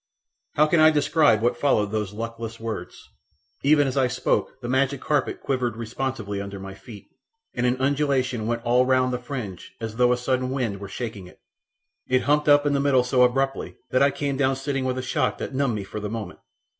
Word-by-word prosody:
How 150 - +5
can 160 +2 +2
I 155 0 +8
describe 145 -6 +3
what 120 +1 +2
followed 110 -6 +1
those 105 -3 -2
luckless 115 +1 -6
words? 115 -1 -6 0.5
Even 145 0 +4
as 130 - -3
I 130 -2 +3
spoke - - -1
the 120 - -6
magic 135 +2 +1
carpet 145 0 -1
quivered 125 -4 -1
responsively 115 -3 -4
under 100 0 -7
my 95 0 -8
feet, 100 +2 -12 0.5
and 125 - 0
an 125 +1 +1
undulation 135 -4 0
went 115 0 -2
all 125 +1 +3
round 130 -1 +2
the 125 - -2
fringe 120 -8 -7
as 115 -1 -6
though 125 0 +4
a 125 - +2
sudden 130 +1 -1
wind 120 -7 -2
were 100 -1 -8
shaking 105 -5 -6
it. - - -18 0.7
It 130 0 +2
humped 150 +1 +2
up 145 0 +6
in 145 - +2
the 140 - +2
middle 140 -3 +3
so 125 0 +2
abruptly 135 +2 +1 0.2
that 130 - +3
I 140 - +6
came 140 0 -2
down 135 -1 +2
sitting 135 0 -2
with 130 0 -1
a 130 - -3
shock 125 - 0
that - - -5
numbed 135 -3 0
me 105 - -3
for 100 +2 -6
the 105 0 -4
moment. 110 -4 -6
125 Hz, 210 wpm, -24 LUFS, 115-135 Hz, 0.7 s, I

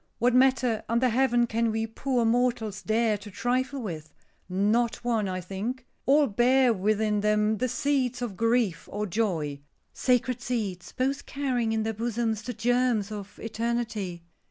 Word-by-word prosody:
What 245 +1 +2
matter 255 -3 +3
under 235 +2 +3
heaven 240 0 +3
can 230 0 0
we 220 0 -1
poor 240 +2 -1
mortals 235 -4 +1
dare 220 -1 +1
to 205 +1 -10
trifle 255 +5 -1
with? 160 -6 -6 0.4
Not 210 +6 +2
one, 225 -5 0
I 185 0 -3
think. 215 +8 -5 0.2
All 290 +2 +5
bear 245 +2 +3
within 210 +1 +1
them 210 +1 +2
the 255 +1 0
seeds 255 -1 0
of 220 -5 -4
grief 230 -5 +1
or 210 +1 -2
joy. 170 -9 -1 0.3
Sacred 250 -1 +1
seeds, 210 -8 -3
both 270 +2 -2
carrying 255 -5 -1
in 220 -1 0
their 220 0 -1
bosoms 225 0 -1
the 245 +2 -5
germs 240 -2 +1
of 205 -2 -7
eternity. 225 -6 -3
230 Hz, 155 wpm, -27 LUFS, 210-250 Hz, 0.4 s, All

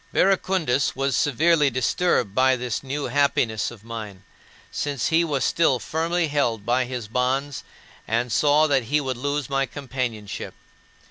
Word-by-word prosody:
Verecundus 185 -9 +1
was 135 -1 0
severely 150 +3 +3
disturbed 130 - 0
by 130 +2 +4
this 125 -2 -3
new 140 +2 -4
happiness 140 -5 +1
of 115 -3 -13
mine, 110 -5 -8 0.5
since 140 -5 -2
he 165 +1 +3
was 145 -5 -1
still 165 -6 +2
firmly 165 +5 -1
held 120 -8 -1
by 125 +2 +1
his 120 -3 -5
bonds 130 +4 -1 0.4
and 115 +2 0
saw 150 +5 +4
that 135 -5 +1
he 150 +6 +1
would 130 -3 -3
lose 145 +1 -2
my 135 -1 0
companionship. 125 -5 -5
135 Hz, 145 wpm, -23 LUFS, 120-145 Hz, 0.5 s, by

